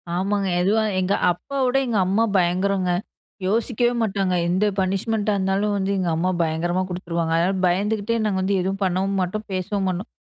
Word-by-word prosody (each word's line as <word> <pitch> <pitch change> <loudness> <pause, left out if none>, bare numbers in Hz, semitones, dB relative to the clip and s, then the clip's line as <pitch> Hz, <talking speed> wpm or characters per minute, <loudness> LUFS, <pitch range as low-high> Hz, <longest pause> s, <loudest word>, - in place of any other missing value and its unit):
ஆமாங்க. 195 +2 0
எதுவா 210 +4 +2 0.2
எங்க 185 +1 +1 0.2
அப்பாவோட 260 +8 -1
எங்க 230 -3 0
அம்மா 200 +5 +2
பயங்கரங்க. 185 +1 +1 0.6
யோசிக்கவே 235 +3 +1
மாட்டாங்க. 195 -4 0 0.2
எந்த 185 +4 +2
பனிஷ்மென்ட்டா 205 +3 0
இருந்தாலும் 195 +2 0
வந்து, 195 0 -1
எங்க 180 -2 0
அம்மா 175 +3 0
பயங்கரமா 170 +3 0
குடுத்துருவாங்க. 170 -2 -3
அதனால 180 +3 +1
பயந்துகிட்டே 205 +5 0
நாங்க 205 -3 0
வந்து 195 +1 +1
எதுவும் 195 +2 -3
பண்ணவும் 190 +1 0
மாட்டோம், 210 +4 -3
பேசவும் 190 +1 -1
மாட்டோம். 185 +3 -4
195 Hz, 155 wpm, -22 LUFS, 180-210 Hz, 0.6 s, எதுவா